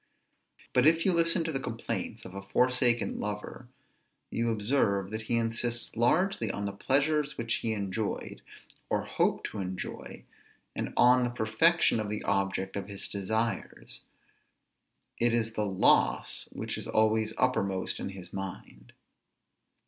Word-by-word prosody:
But 130 Hz, +3 st, +5 dB
if 165 Hz, +1 st, +4 dB
you 190 Hz, -, +4 dB
listen 165 Hz, 0 st, +3 dB
to 165 Hz, -, -2 dB
the 135 Hz, -, -1 dB
complaints 115 Hz, -3 st, -4 dB
of -, -, -9 dB
a 100 Hz, -, -6 dB
forsaken 125 Hz, +3 st, +2 dB
lover, 105 Hz, +3 st, -5 dB, 0.6 s
you 115 Hz, 0 st, 0 dB
observe 105 Hz, -3 st, +1 dB
that 110 Hz, +1 st, -3 dB
he 120 Hz, -, +2 dB
insists 115 Hz, +1 st, 0 dB
largely 125 Hz, -, +2 dB
on 100 Hz, +1 st, -2 dB
the 100 Hz, -, -2 dB
pleasures 145 Hz, +7 st, +1 dB
which 115 Hz, -1 st, 0 dB
he 115 Hz, -, -1 dB
enjoyed, 100 Hz, 0 st, -3 dB, 0.5 s
or -, -, 0 dB
hoped -, -, 0 dB
to 105 Hz, -, -6 dB
enjoy, 95 Hz, -1 st, -6 dB, 0.5 s
and -, -, -3 dB
on 125 Hz, +1 st, +6 dB
the 120 Hz, -, +1 dB
perfection 120 Hz, +6 st, +3 dB
of 105 Hz, -1 st, -3 dB
the 105 Hz, 0 st, -3 dB
object 95 Hz, 0 st, -1 dB
of 100 Hz, -1 st, -4 dB
his 100 Hz, -1 st, -6 dB
desires; 110 Hz, +3 st, -2 dB, 1.2 s
it 120 Hz, 0 st, +3 dB
is 115 Hz, -1 st, -1 dB
the 105 Hz, -1 st, -1 dB
loss 95 Hz, -1 st, +3 dB
which -, -, -4 dB
is -, -, -6 dB
always 110 Hz, 0 st, +2 dB
uppermost 100 Hz, -7 st, 0 dB
in -, -, -4 dB
his 95 Hz, -2 st, -9 dB
mind. 95 Hz, -11 st, -7 dB
110 Hz, 145 wpm, -29 LUFS, 100-125 Hz, 1.2 s, on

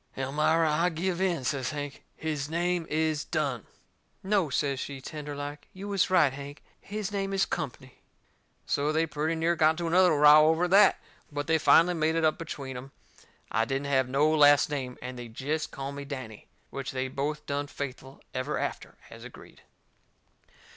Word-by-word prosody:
"Elmira, 150 Hz, +5 st, +2 dB
I 165 Hz, +4 st, +2 dB
give 175 Hz, +2 st, -2 dB
in," 175 Hz, -7 st, 0 dB
says 130 Hz, +1 st, -1 dB
Hank. 145 Hz, -2 st, -6 dB
"His 150 Hz, -2 st, -3 dB
name 175 Hz, 0 st, -1 dB
is 155 Hz, -1 st, 0 dB
Dunne." 140 Hz, -, -2 dB, 0.6 s
"No," 195 Hz, -5 st, +1 dB
says 140 Hz, 0 st, -1 dB
she, 140 Hz, 0 st, -5 dB
tender 145 Hz, +1 st, -7 dB
like, 145 Hz, +1 st, -7 dB
"you 195 Hz, +1 st, -8 dB
was 200 Hz, -2 st, +1 dB
right, 175 Hz, -8 st, +4 dB
Hank. 140 Hz, +1 st, -9 dB, 0.2 s
His 210 Hz, 0 st, -5 dB
name 195 Hz, -1 st, -2 dB
is 195 Hz, -2 st, +2 dB
Company." 130 Hz, -5 st, -6 dB, 0.6 s
So 145 Hz, +2 st, 0 dB
they 160 Hz, +1 st, +2 dB
pretty 155 Hz, +1 st, -2 dB
near 165 Hz, +1 st, +1 dB
got 155 Hz, -1 st, +4 dB
into 170 Hz, +1 st, -4 dB
another 180 Hz, +1 st, +4 dB
row 150 Hz, +1 st, +7 dB
over 160 Hz, +3 st, +2 dB
that. 200 Hz, +2 st, +6 dB, 0.3 s
But 145 Hz, 0 st, -3 dB
they 160 Hz, +1 st, +2 dB
finally 170 Hz, +3 st, +5 dB
made 160 Hz, -1 st, 0 dB
it 165 Hz, -1 st, +2 dB
up 155 Hz, -, +1 dB
between 140 Hz, -5 st, -6 dB
em 135 Hz, +2 st, -9 dB, 0.6 s
I 110 Hz, -, +2 dB
didn't 135 Hz, +4 st, -2 dB
have 130 Hz, -1 st, +2 dB
no 140 Hz, +4 st, +3 dB
last 145 Hz, -1 st, +5 dB
name, 130 Hz, -4 st, -4 dB
and 125 Hz, 0 st, -6 dB
they'd 115 Hz, -2 st, -9 dB
jest 155 Hz, +5 st, -2 dB
call 135 Hz, 0 st, -6 dB
me 140 Hz, 0 st, -7 dB
Danny. 130 Hz, -7 st, -8 dB, 0.2 s
Which 135 Hz, -1 st, -5 dB
they 130 Hz, 0 st, -2 dB
both 145 Hz, +3 st, -3 dB
done 145 Hz, 0 st, -2 dB
faithful 135 Hz, -1 st, -7 dB
ever 130 Hz, +3 st, -2 dB
after, -, -, -5 dB
as -, -, -11 dB
agreed. -, -, -13 dB
150 Hz, 180 wpm, -28 LUFS, 135-165 Hz, 0.6 s, row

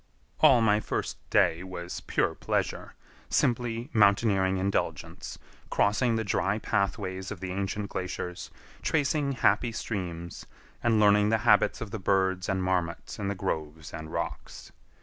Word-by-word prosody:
All 125 Hz, -3 st, +6 dB
my 105 Hz, -2 st, +4 dB
first 110 Hz, -, -3 dB
day 85 Hz, -1 st, +3 dB
was 90 Hz, -1 st, -6 dB
pure -, -, 0 dB
pleasure; -, -, -2 dB, 0.3 s
simply 120 Hz, +1 st, 0 dB
mountaineering 100 Hz, -2 st, +3 dB
indulgence, 95 Hz, +1 st, -2 dB, 0.3 s
crossing 115 Hz, +4 st, +2 dB
the 110 Hz, -, 0 dB
dry 100 Hz, 0 st, 0 dB
pathways 95 Hz, -2 st, -2 dB
of 100 Hz, -, -6 dB
the 95 Hz, 0 st, -5 dB
ancient 100 Hz, +2 st, -3 dB
glaciers, 90 Hz, -1 st, -5 dB, 0.3 s
tracing 145 Hz, -2 st, +1 dB
happy 120 Hz, -1 st, +2 dB
streams, 85 Hz, -7 st, -5 dB, 0.4 s
and 115 Hz, -2 st, +3 dB
learning 105 Hz, 0 st, +5 dB
the 110 Hz, -, +3 dB
habits 120 Hz, -, +4 dB
of 115 Hz, -3 st, -5 dB
the 110 Hz, -, -4 dB
birds 95 Hz, -1 st, +1 dB
and 95 Hz, -1 st, 0 dB
marmots 90 Hz, 0 st, -2 dB
in 100 Hz, -, -2 dB
the 100 Hz, -, -1 dB
groves 80 Hz, -3 st, -4 dB
and 80 Hz, -1 st, -7 dB
rocks. -, -, -5 dB
100 Hz, 140 wpm, -28 LUFS, 95-110 Hz, 0.4 s, All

